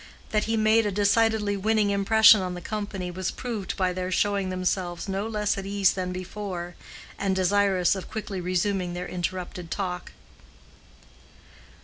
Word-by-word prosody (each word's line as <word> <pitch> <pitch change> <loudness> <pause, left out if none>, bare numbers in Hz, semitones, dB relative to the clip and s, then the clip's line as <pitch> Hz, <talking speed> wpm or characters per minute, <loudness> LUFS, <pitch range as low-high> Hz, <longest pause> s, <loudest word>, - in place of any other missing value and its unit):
That 215 -1 +1
he 225 0 0
made 220 0 +4
a - - -1
decidedly 210 +1 +2
winning 210 +1 +1
impression 215 +1 +6
on 180 -1 -3
the - - -5
company 200 -2 -4
was 185 +1 -3
proved 230 -6 -4
by 185 -1 +1
their 185 0 -3
showing 200 0 +1
themselves 185 -1 -2
no 195 +2 -2
less 210 -2 -1
at 195 - -6
ease 200 -2 +3
than 185 -1 -3
before, 185 -1 -5 0.5
and 195 -1 0
desirous 190 -1 +3
of 190 - -7
quickly 205 -4 -5
resuming 180 0 -1
their 180 0 -4
interrupted 180 -1 -4
talk. 180 -2 -4
195 Hz, 150 wpm, -26 LUFS, 180-210 Hz, 0.5 s, impression